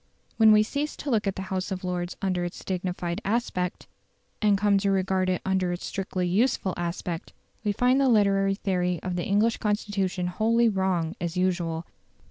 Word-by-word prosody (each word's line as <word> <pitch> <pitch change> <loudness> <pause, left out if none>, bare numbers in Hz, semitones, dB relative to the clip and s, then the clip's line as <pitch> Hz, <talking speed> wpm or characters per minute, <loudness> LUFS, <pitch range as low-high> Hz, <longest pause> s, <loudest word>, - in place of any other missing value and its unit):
When 220 -1 +7
we 215 0 +6
cease 285 +7 -3
to 285 - -4
look 215 -3 +1
at 195 - 0
the 190 - -4
House 185 +1 -2
of 190 0 -4
Lords 180 -1 -3
under 185 -2 0
its 175 - -6
dignified 180 0 -3
aspect, 195 -5 -1 0.6
and 205 -2 +4
come 200 0 +3
to 200 0 0
regard 190 -1 +1
it 180 - -1
under 190 -1 +1
its 175 - -4
strictly 185 -2 -2
useful 200 0 +1
aspect, 170 -1 -4 0.3
we 210 - +1
find 250 +6 +3
the 270 - +4
literary 195 -3 +3
theory 180 -3 -1
of 180 -1 -2
the 175 - -2
English 210 +3 +2
Constitution 205 -3 -1
wholly 225 +6 +2
wrong, 190 -4 0
as 170 +1 -3
usual. 175 -3 0
190 Hz, 180 wpm, -26 LUFS, 180-210 Hz, 0.6 s, When